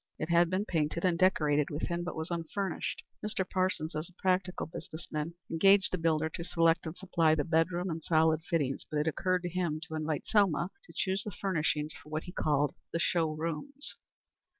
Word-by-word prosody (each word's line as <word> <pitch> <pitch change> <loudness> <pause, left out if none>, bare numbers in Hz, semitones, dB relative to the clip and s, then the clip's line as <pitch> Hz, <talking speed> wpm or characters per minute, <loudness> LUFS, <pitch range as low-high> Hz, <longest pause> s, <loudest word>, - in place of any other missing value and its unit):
It 155 - -3
had 170 0 +5
been 185 +3 0
painted 165 -1 0
and 180 -2 +3
decorated 150 -5 +3
within, 170 +3 -2
but 175 - -4
was 160 +2 -4
unfurnished. 170 +2 -3 0.2
Mr. 205 -3 -1
Parsons, 185 -4 0
as 155 +3 -3
a 180 - -25
practical 185 -1 +1
business 160 0 -7
man, 155 +2 -3 0.2
engaged 195 +4 +5
the 185 - -1
builder 160 -1 +2
to 165 +2 -5
select 165 -1 +2
and 160 - -6
supply 165 -4 +2
the 150 - +1
bedroom 170 +3 +1
and 160 0 -4
solid 160 -1 +3
fittings, 150 -5 -1
but 150 - -2
it 150 +2 +1
occurred 185 +3 +1
to 175 - -2
him 170 -3 -1
to 160 - -8
invite 155 -2 -2
Selma 190 -4 +2
to - - -15
choose 190 0 0
the - - -4
furnishings 155 -6 -1
for 150 - -14
what 155 +1 -2
he 180 - -8
called 145 -5 +1 0.2
the - - 0
show 170 -1 +2
rooms. 165 - -3
165 Hz, 195 wpm, -31 LUFS, 155-185 Hz, 0.2 s, had